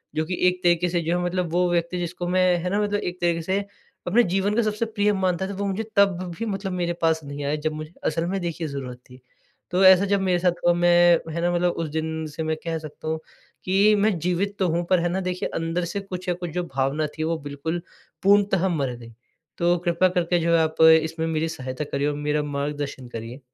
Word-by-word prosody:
जो 155 - 0
कि 180 +2 -3
एक 180 0 0
तरीके 175 0 +3
से 170 -1 0
जो 170 +2 0
है 175 - -1
मतलब 175 -2 -1
वो 180 0 +2
व्यक्ति 170 +1 0
जिसको 175 0 -4
मैं 185 +1 +3 0.2
है 180 - -1
न - - +2
मतलब 205 0 0
एक 180 -2 -5
तरीके 170 -1 +1
से 190 +4 0 0.5
अपने 235 +7 +4
जीवन 195 +3 0
का 235 - +3
सबसे 215 +1 -1
प्रिय 210 -2 +1
मानता 190 -1 0
था 200 - -5
वो 200 +1 -3
मुझे 200 +3 -2
तब 200 -3 +4 0.2
भी 230 - -2
मतलब 195 -2 -3
मेरे 175 -1 -1
पास 160 -1 +2
नहीं 145 0 -6
आए 150 +2 0
जब 155 +1 -2
मुझे 155 +2 -7
असल 165 0 0
में 195 0 -1
देखिए 170 -2 -3
ज़रूरत 130 -3 -6
थी? 125 0 -15 0.5
तो 185 +2 +2
ऐसा 190 +1 +8
जब 200 0 +1
मेरे 180 -2 +1
साथ 180 0 +3 0.2
मैं 175 0 +5
है 170 - -2
ना, 175 +1 +1
मतलब 175 0 +2
उस 165 -3 -4
दिन 160 +1 -3
से 160 - -3
मैं 160 0 -1
कह 165 -1 -2
सकता 155 0 -9
हूँ 160 0 -1 0.5
कि 200 +3 +4
मैं 205 -3 +2
जीवित 180 +4 -1
तो 185 - +2
हूँ 170 +2 0
पर 185 -2 +4
है 175 +1 0
ना, 185 - -1
देखिए 180 0 -2
अंदर 165 +2 -1
से 200 - -1
कुछ 185 -2 -6
न - - +2
कुछ 175 -1 -5
जो 180 +2 -2
भावना 135 +3 0
थी 155 - -1
वो 165 0 0
बिल्कुल 160 +4 -3 0.4
पूर्णतः 195 -2 +4
मर 140 -7 -1
गई। 115 -1 -12 0.4
तो 175 +1 +2
कृपया 175 +2 +3
करके 175 -1 +1
जो 170 0 +1
है - - +4
आप 160 0 -2 0.2
इसमें 160 0 -3
मेरी 160 0 0
सहायता 130 -1 -5
करिए 140 +1 0
और 145 - -1
मेरा 150 0 -1
मार्गदर्शन 145 -2 -4
करिए। 115 +3 -7
175 Hz, 235 wpm, -24 LUFS, 160-185 Hz, 0.5 s, ऐसा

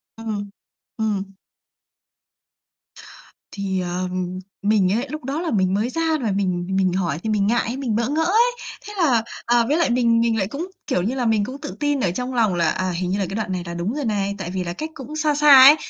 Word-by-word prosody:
Ừm, 215 -3 -4 0.5
ừm. 200 -3 -2 2.2
Thì, 195 -2 -2
ờ, 180 +1 -2 0.5
mình 200 -3 +3
ấy 240 +6 -1
lúc 305 -2 -6
đó 280 +5 -2
là 340 - -2
mình 190 -3 +2
mới 215 +5 0
ra 330 +4 -2 0.2
và 220 -4 0
mình 180 -3 -1
mình 190 -2 +2
hỏi 170 -5 -1
thì 220 - -2
mình 205 -2 +2
ngại, 240 +2 0
mình 245 -6 -1
bỡ 235 +3 0
ngỡ 315 +2 +1
ấy. 450 +8 +4 0.4
Thế 420 - -7
là, 260 -11 +3 0.2
ờ, 240 0 +3
với 300 +5 +2
lại 335 -6 +2
mình 235 -1 +3
mình 230 -1 +2
lại 195 -3 0
cũng, 295 - -5 0.2
kiểu 180 - +1
như 230 +7 -1
là, 250 -2 -1
mình 220 -2 +2
cũng 260 +5 -6
tự 295 - -6
tin 290 -1 +1
ở 180 -7 +1
trong 250 +6 -4
lòng 225 -5 +2
là, 170 -2 +2
à, 185 +2 -1
hình 180 +1 -2
như 195 +2 0
là 195 - 0
cái 195 - -4
đoạn 220 -3 -2
này 180 -2 -2
là 170 - -5
đúng 170 +6 -2
rồi 290 -2 -3
này, 200 -2 -1
tại 185 -3 -5
vì 185 -1 -2
là 170 - -4
cách 310 - -5
cũng 275 +3 -8
xa 305 -1 +1
xa 290 -3 +8
ấy, 290 +3 +10
220 Hz, 235 wpm, -22 LUFS, 190-270 Hz, 2.2 s, ấy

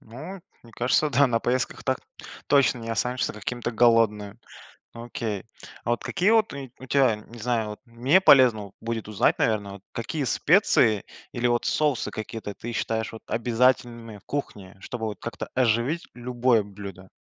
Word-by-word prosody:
Ну, 155 - -9 0.2
мне 115 - -17
кажется- 130 +6 +1
да, 140 +1 +4
на 120 -3 +1
поездках 125 +4 -2
так 130 -1 0 0.5
точно 140 -4 +3
не 115 -1 -7
останешься 125 +3 -1
каким-то 120 +3 -4
голодным. 110 -3 +2 0.6
Ну 115 0 -8
окей. 115 -6 -4 0.4
А 120 - -1
вот 120 - -1
какие 190 +5 +1
вот 220 -1 +3
у 140 -2 -7
у 130 - -9
тя, 130 -4 +3
не 115 +2 -13
знаю, 115 -1 -1
вот 105 - -8
мне 125 +9 +3
полезно 125 - +6
вот 100 - -14
будет 115 -1 -4
узнать, 105 -2 +2
наверно, 105 -3 0
вот 100 - -11
какие 140 +6 -3
специи 130 - +3 0.3
или 120 - -2
вот 120 0 +1
соусы 150 -5 +1
какие-то 110 -1 -6
ты 120 - -6
считаешь 110 0 -2
вот 115 - -10
обязательными 120 -1 0
в 100 - -21
кухне, 100 -10 -5
чтобы 110 +3 -5
вот 105 - -5
как-то 115 - -6
оживить 125 +6 +1
любое 120 -2 +1
блюдо? 100 -2 -10
120 Hz, 170 wpm, -25 LUFS, 110-130 Hz, 0.6 s, полезно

